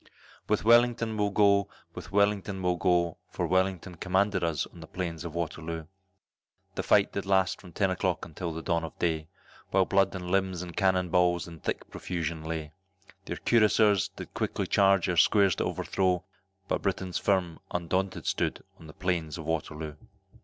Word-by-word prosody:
With 105 Hz, -, +1 dB
Wellington 120 Hz, -1 st, +4 dB
we'll 105 Hz, -1 st, +1 dB
go, 100 Hz, -1 st, +3 dB, 0.2 s
with -, -, -9 dB
Wellington 100 Hz, -1 st, +1 dB
we'll 90 Hz, -1 st, +1 dB
go, 85 Hz, -2 st, +1 dB
For 90 Hz, -, -2 dB
Wellington 95 Hz, 0 st, 0 dB
commanded 95 Hz, +2 st, +1 dB
us 80 Hz, -3 st, 0 dB
on 85 Hz, -, -15 dB
the 80 Hz, -, -10 dB
Plains 85 Hz, -2 st, -4 dB
of 85 Hz, -1 st, -7 dB
Waterloo, 80 Hz, -1 st, -4 dB, 0.9 s
The -, -, -2 dB
fight 100 Hz, -1 st, +3 dB
did 100 Hz, -1 st, -3 dB
last 95 Hz, -2 st, +2 dB
from 90 Hz, -, -13 dB
ten 95 Hz, +2 st, +1 dB
o'clock 90 Hz, -2 st, -1 dB
until 85 Hz, +2 st, -5 dB
the 80 Hz, 0 st, -6 dB
dawn 85 Hz, 0 st, 0 dB
of 80 Hz, -, -7 dB
day, 80 Hz, -2 st, -1 dB, 0.4 s
While 95 Hz, -1 st, +3 dB
blood 95 Hz, 0 st, +2 dB
and 90 Hz, -1 st, -5 dB
limbs 95 Hz, -2 st, 0 dB
and 85 Hz, -2 st, -9 dB
cannon 95 Hz, -2 st, +2 dB
balls 90 Hz, 0 st, +2 dB
in 85 Hz, -1 st, -10 dB
thick -, -, -3 dB
profusion 85 Hz, -3 st, -4 dB
lay; 80 Hz, -2 st, -4 dB, 0.5 s
Their -, -, -4 dB
Cuirassieurs 105 Hz, -4 st, +3 dB
did -, -, -9 dB
quickly -, -, -2 dB
charge 95 Hz, -2 st, +3 dB
our 90 Hz, -2 st, -1 dB
squares 100 Hz, -1 st, +5 dB
to -, -, 0 dB
overthrow, 90 Hz, -2 st, 0 dB, 0.4 s
But -, -, -1 dB
Britons 95 Hz, -2 st, -2 dB
firm, 90 Hz, -4 st, 0 dB
undaunted 95 Hz, +2 st, -2 dB
stood, -, -, -1 dB, 0.2 s
on 80 Hz, -, -12 dB
the 75 Hz, -, -11 dB
Plains 85 Hz, -4 st, -2 dB
of 80 Hz, -, -7 dB
Waterloo. 80 Hz, -1 st, -3 dB
90 Hz, 175 wpm, -28 LUFS, 85-95 Hz, 0.9 s, squares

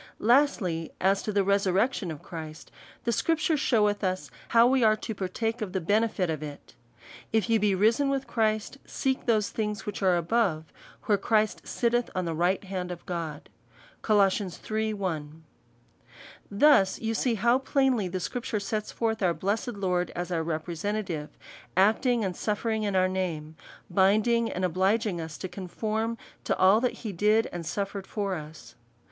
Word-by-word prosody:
Lastly, 215 Hz, -, +2 dB
As 195 Hz, +1 st, +2 dB
to 215 Hz, -, -3 dB
the 200 Hz, -1 st, +2 dB
resurrection 200 Hz, +2 st, +1 dB
of 155 Hz, -3 st, -7 dB
Christ, 160 Hz, -2 st, -8 dB, 0.3 s
the 235 Hz, -, 0 dB
scrip 325 Hz, +8 st, +1 dB
ture 315 Hz, +1 st, +1 dB
sheweth 210 Hz, -7 st, +2 dB
us 185 Hz, -6 st, -2 dB, 0.2 s
how 230 Hz, 0 st, +5 dB
we 255 Hz, 0 st, +3 dB
are 215 Hz, -1 st, +5 dB
to 220 Hz, +1 st, -5 dB
partake 225 Hz, +4 st, -3 dB
of 195 Hz, -4 st, -4 dB
the 190 Hz, -, 0 dB
benefit 205 Hz, +1 st, +1 dB
of 155 Hz, -2 st, -3 dB
it; 145 Hz, -2 st, -9 dB, 0.3 s
'' -, -, -18 dB
If 225 Hz, +1 st, +1 dB
ye 225 Hz, -, +4 dB
be 205 Hz, -2 st, +2 dB
risen 225 Hz, +8 st, +3 dB
with 275 Hz, -1 st, -1 dB
Christ, 220 Hz, +3 st, -1 dB
seek 265 Hz, -1 st, -2 dB
those 215 Hz, -3 st, +2 dB
things 210 Hz, -1 st, -3 dB
which 210 Hz, -1 st, -5 dB
are 185 Hz, -2 st, +4 dB
above, 170 Hz, -3 st, 0 dB, 0.3 s
where 205 Hz, -3 st, +2 dB
Christ 215 Hz, +1 st, +1 dB
sitteth 240 Hz, 0 st, 0 dB
on 185 Hz, -1 st, -1 dB
the 165 Hz, -, -2 dB
right 175 Hz, +5 st, +1 dB
hand 185 Hz, -2 st, -4 dB
of 175 Hz, -, -8 dB
God." 165 Hz, -4 st, -5 dB, 0.5 s
Col. 205 Hz, -3 st, +4 dB, 0.4 s
iii. 220 Hz, 0 st, 0 dB
1. 160 Hz, -5 st, -4 dB, 1.1 s
Thus 200 Hz, -3 st, +4 dB
you 225 Hz, 0 st, -2 dB
see 235 Hz, +1 st, +1 dB
how 235 Hz, +4 st, +3 dB
plainly 265 Hz, -6 st, +1 dB
the 185 Hz, +1 st, -3 dB
Scripture 230 Hz, +3 st, -3 dB
sets 210 Hz, +1 st, -3 dB
forth 220 Hz, -2 st, -1 dB
our 175 Hz, -3 st, +2 dB
blessed 210 Hz, +5 st, -2 dB
Lord, 180 Hz, -3 st, 0 dB
as 175 Hz, 0 st, -4 dB
our 165 Hz, -2 st, 0 dB
representative, 165 Hz, +1 st, -3 dB, 0.5 s
acting 220 Hz, +4 st, +3 dB
and 185 Hz, -2 st, -3 dB
suffering 220 Hz, +2 st, -1 dB
in 205 Hz, -2 st, -1 dB
our 185 Hz, 0 st, +4 dB
name, 165 Hz, -5 st, -3 dB, 0.3 s
binding 215 Hz, +4 st, +3 dB
and 185 Hz, -, -1 dB
obliging 190 Hz, +1 st, +1 dB
us 160 Hz, -1 st, -7 dB
to 185 Hz, -, -5 dB
con 185 Hz, 0 st, -8 dB
form 220 Hz, +4 st, -2 dB, 0.3 s
to -, -, 0 dB
all 195 Hz, +4 st, +5 dB
that 250 Hz, -, +1 dB
he 215 Hz, -, -2 dB
did 210 Hz, +4 st, +2 dB
and 175 Hz, -1 st, -4 dB
suffered 195 Hz, +1 st, -3 dB
for 200 Hz, -3 st, -2 dB
us. 155 Hz, -2 st, -8 dB
200 Hz, 175 wpm, -27 LUFS, 180-225 Hz, 1.1 s, how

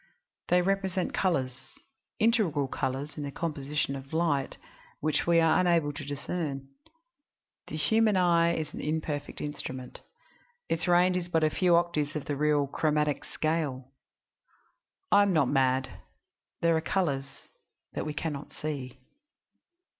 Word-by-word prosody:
They 180 Hz, 0 st, +4 dB
represent 190 Hz, -1 st, 0 dB
colors 135 Hz, -8 st, -1 dB, 0.4 s
integral 205 Hz, -, +2 dB
colors 135 Hz, +3 st, -3 dB
in -, -, -4 dB
the 140 Hz, -, -3 dB
composition 145 Hz, -2 st, -2 dB
of 135 Hz, +2 st, -9 dB
light 160 Hz, -4 st, 0 dB, 0.4 s
which 155 Hz, +2 st, 0 dB
we 170 Hz, -1 st, +5 dB
are 165 Hz, -1 st, +4 dB
unable 170 Hz, -5 st, +2 dB
to 145 Hz, 0 st, -6 dB
discern. 145 Hz, -1 st, -4 dB, 1.0 s
The -, -, -6 dB
human 215 Hz, +6 st, +3 dB
eye 170 Hz, -2 st, +4 dB
is 155 Hz, -2 st, -4 dB
an -, -, -6 dB
imperfect 155 Hz, -1 st, -3 dB
instrument; 130 Hz, -3 st, -5 dB, 0.7 s
its 165 Hz, -, -1 dB
range 180 Hz, +1 st, +4 dB
is 175 Hz, -1 st, -3 dB
but 160 Hz, -2 st, +2 dB
a 155 Hz, -, +3 dB
few 180 Hz, 0 st, +3 dB
octaves 165 Hz, -4 st, +1 dB
of 150 Hz, -, -3 dB
the 145 Hz, -, -2 dB
real 150 Hz, 0 st, +2 dB
'chromatic 150 Hz, 0 st, 0 dB
scale' 145 Hz, -5 st, -2 dB, 1.2 s
I 205 Hz, -, +7 dB
am 200 Hz, -2 st, +3 dB
not 155 Hz, -6 st, +3 dB
mad; 130 Hz, -1 st, +1 dB, 0.6 s
there 170 Hz, -1 st, +4 dB
are 160 Hz, -, +1 dB
colors 155 Hz, -7 st, 0 dB, 0.7 s
that -, -, -3 dB
we 150 Hz, -, -4 dB
can 160 Hz, 0 st, -2 dB
not 140 Hz, +1 st, -8 dB
see. 135 Hz, -4 st, -5 dB
155 Hz, 140 wpm, -29 LUFS, 140-170 Hz, 1.2 s, I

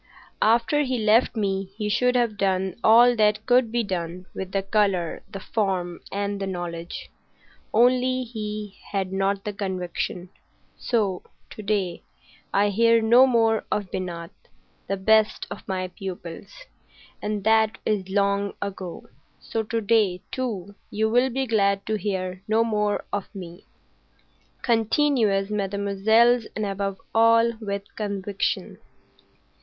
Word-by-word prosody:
After 235 Hz, +6 st, +3 dB
he 260 Hz, -3 st, 0 dB
left 220 Hz, +3 st, +3 dB
me 195 Hz, -2 st, -1 dB
he 210 Hz, -2 st, -2 dB
should 250 Hz, +4 st, +2 dB
have 235 Hz, -3 st, +2 dB
done 190 Hz, -2 st, 0 dB
all 240 Hz, +2 st, +7 dB
that 210 Hz, 0 st, +2 dB
could 245 Hz, -2 st, +3 dB
be 240 Hz, 0 st, +1 dB
done 180 Hz, -2 st, -4 dB
with 190 Hz, -1 st, -6 dB
the 195 Hz, 0 st, 0 dB
colour, 195 Hz, -4 st, 0 dB
the 195 Hz, -, -7 dB
form, 185 Hz, -4 st, -2 dB
and 200 Hz, 0 st, -2 dB
the 195 Hz, -, -3 dB
knowledge. 175 Hz, -2 st, -6 dB, 0.6 s
Only, 255 Hz, +2 st, +3 dB
he 210 Hz, -3 st, -6 dB
had 190 Hz, -2 st, -2 dB
not 195 Hz, +1 st, 0 dB
the 210 Hz, -, -4 dB
conviction. 185 Hz, -2 st, -4 dB, 0.5 s
So 200 Hz, -6 st, 0 dB, 0.3 s
to -, -, -8 dB
day 200 Hz, -4 st, -1 dB, 0.5 s
I 205 Hz, +1 st, +3 dB
hear 230 Hz, +3 st, +4 dB
no 235 Hz, +4 st, +6 dB
more 225 Hz, -3 st, +2 dB
of 200 Hz, -3 st, -2 dB
Binat,—the 180 Hz, +2 st, -7 dB
best 215 Hz, +2 st, +3 dB
of -, -, -8 dB
my 185 Hz, -2 st, -2 dB
pupils,—and 200 Hz, -, -8 dB
that 220 Hz, 0 st, +3 dB
is 200 Hz, -3 st, -1 dB
long 200 Hz, 0 st, +1 dB
ago. 190 Hz, -3 st, -6 dB, 0.3 s
So 225 Hz, -, -3 dB
to 225 Hz, +1 st, -2 dB
day, 205 Hz, -4 st, +2 dB
too, 205 Hz, -7 st, -4 dB, 0.2 s
you 220 Hz, +1 st, 0 dB
will 245 Hz, +3 st, +3 dB
be 265 Hz, +2 st, -1 dB
glad 200 Hz, -4 st, +1 dB
to 220 Hz, -, -2 dB
hear 185 Hz, -3 st, -2 dB
no 220 Hz, +1 st, +3 dB
more 210 Hz, -2 st, 0 dB
of 205 Hz, -1 st, -2 dB
me. 175 Hz, -1 st, -9 dB, 1.0 s
Continuez, 225 Hz, -4 st, +2 dB
mesdemoiselles, 210 Hz, +4 st, +2 dB
and, 215 Hz, -, -1 dB
above 195 Hz, -1 st, -3 dB
all, 230 Hz, +1 st, +5 dB
with 200 Hz, -2 st, -3 dB
conviction." 200 Hz, -2 st, -3 dB
205 Hz, 130 wpm, -24 LUFS, 195-225 Hz, 1.0 s, all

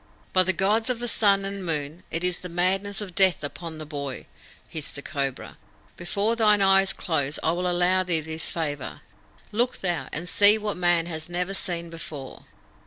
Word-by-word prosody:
"By 185 Hz, -, +6 dB
the 185 Hz, +1 st, +3 dB
Gods 210 Hz, +6 st, +1 dB
of 250 Hz, -, 0 dB
the 240 Hz, +1 st, -3 dB
Sun 200 Hz, -4 st, +3 dB
and 195 Hz, 0 st, -4 dB
Moon, 155 Hz, 0 st, -3 dB
it 165 Hz, +2 st, -3 dB
is 180 Hz, -1 st, 0 dB
the 180 Hz, -, -8 dB
madness 190 Hz, +4 st, 0 dB
of 195 Hz, -4 st, -7 dB
death 185 Hz, -4 st, +4 dB
upon 160 Hz, +2 st, -6 dB
the 155 Hz, -, -7 dB
boy!" 140 Hz, -3 st, -6 dB, 0.4 s
hissed 155 Hz, -3 st, -4 dB
the 140 Hz, -, -7 dB
Cobra. 135 Hz, -2 st, -4 dB, 0.4 s
"Before 200 Hz, +6 st, -1 dB
thine 210 Hz, -2 st, +4 dB
eyes 195 Hz, 0 st, +4 dB
close 150 Hz, -4 st, -2 dB
I 160 Hz, -, +2 dB
will 180 Hz, +2 st, -1 dB
allow 180 Hz, +1 st, +3 dB
thee 175 Hz, -3 st, +1 dB
this 160 Hz, +1 st, -4 dB
favour. 145 Hz, -4 st, -4 dB, 0.5 s
Look 240 Hz, +4 st, 0 dB
thou, 170 Hz, -8 st, -1 dB
and 165 Hz, +4 st, -5 dB
see 205 Hz, +3 st, +7 dB
what 210 Hz, -1 st, -3 dB
man 175 Hz, -2 st, +2 dB
has 160 Hz, -1 st, -5 dB
never 180 Hz, +2 st, -2 dB
seen 170 Hz, -3 st, -3 dB
before!" 150 Hz, -5 st, -8 dB
175 Hz, 185 wpm, -25 LUFS, 160-195 Hz, 0.5 s, see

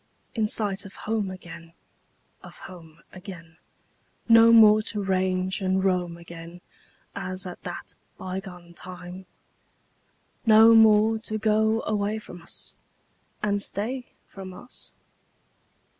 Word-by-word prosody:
In 220 Hz, -2 st, 0 dB
sight 200 Hz, -2 st, -1 dB
of 195 Hz, -, -12 dB
home 215 Hz, -3 st, -1 dB
again, 170 Hz, -2 st, -11 dB, 0.7 s
Of -, -, -13 dB
home 165 Hz, -3 st, -13 dB
again; 175 Hz, -4 st, -11 dB, 0.7 s
No 230 Hz, 0 st, +7 dB
more 215 Hz, -2 st, +7 dB
to 210 Hz, -1 st, -3 dB
range 185 Hz, 0 st, 0 dB
and 190 Hz, 0 st, +1 dB
roam 180 Hz, -3 st, 0 dB
again 170 Hz, 0 st, -11 dB, 0.5 s
As 185 Hz, -1 st, -4 dB
at 180 Hz, -, -8 dB
that -, -, -7 dB, 0.2 s
bygone 185 Hz, -2 st, -7 dB
time? 180 Hz, +1 st, -10 dB, 1.2 s
No 225 Hz, 0 st, +7 dB
more 220 Hz, 0 st, +5 dB
to 220 Hz, -1 st, -5 dB
go 220 Hz, +1 st, +2 dB
away 210 Hz, 0 st, -1 dB
from 180 Hz, -5 st, -11 dB
us 165 Hz, -, -11 dB, 0.7 s
And 205 Hz, -1 st, +1 dB
stay 245 Hz, +6 st, -3 dB, 0.2 s
from 190 Hz, -1 st, -10 dB
us? 245 Hz, -, -14 dB
195 Hz, 115 wpm, -25 LUFS, 180-215 Hz, 1.2 s, No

